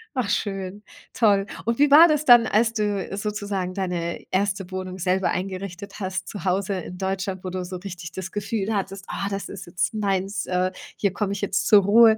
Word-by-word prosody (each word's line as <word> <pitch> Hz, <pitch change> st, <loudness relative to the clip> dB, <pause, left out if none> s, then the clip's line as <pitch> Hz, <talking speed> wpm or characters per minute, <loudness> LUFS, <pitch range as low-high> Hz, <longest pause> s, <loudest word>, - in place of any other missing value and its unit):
Ach, 250 Hz, -5 st, 0 dB
schön. 195 Hz, -1 st, -2 dB, 0.3 s
Toll. 200 Hz, -4 st, +3 dB, 0.2 s
Und 230 Hz, +1 st, 0 dB
wie 290 Hz, 0 st, +4 dB
war 320 Hz, +4 st, +10 dB
das 305 Hz, -2 st, +1 dB
dann, 240 Hz, -3 st, +8 dB
als 225 Hz, +2 st, +2 dB
du 205 Hz, -3 st, -1 dB
sozusagen 205 Hz, -3 st, -3 dB
deine 175 Hz, -3 st, -3 dB
1. 195 Hz, -1 st, 0 dB
Wohnung 185 Hz, 0 st, -5 dB
selber 185 Hz, +1 st, +1 dB
eingerichtet 190 Hz, +1 st, -5 dB
hast, 190 Hz, -1 st, -3 dB
zu 200 Hz, -4 st, -7 dB
Hause 195 Hz, +2 st, +1 dB
in 180 Hz, 0 st, -8 dB
Deutschland, 190 Hz, 0 st, -3 dB
wo 185 Hz, -, -3 dB
du 185 Hz, 0 st, -3 dB
so 180 Hz, +1 st, -6 dB
richtig 175 Hz, -3 st, -8 dB
das 190 Hz, +1 st, -6 dB
Gefühl 205 Hz, +1 st, -2 dB
hattest: 195 Hz, 0 st, -3 dB
„Ah, 195 Hz, -, -3 dB
das 195 Hz, 0 st, -4 dB
ist 185 Hz, -3 st, -8 dB
jetzt 175 Hz, +4 st, -1 dB
meins! 195 Hz, -1 st, -1 dB
Äh, 185 Hz, 0 st, +1 dB, 0.2 s
hier 200 Hz, -3 st, 0 dB
komme 205 Hz, -1 st, -1 dB
ich 200 Hz, -, -5 dB
jetzt 200 Hz, -, 0 dB
zur 205 Hz, -2 st, +7 dB
Ruhe.“ 220 Hz, +2 st, +7 dB
195 Hz, 195 wpm, -24 LUFS, 185-210 Hz, 0.3 s, war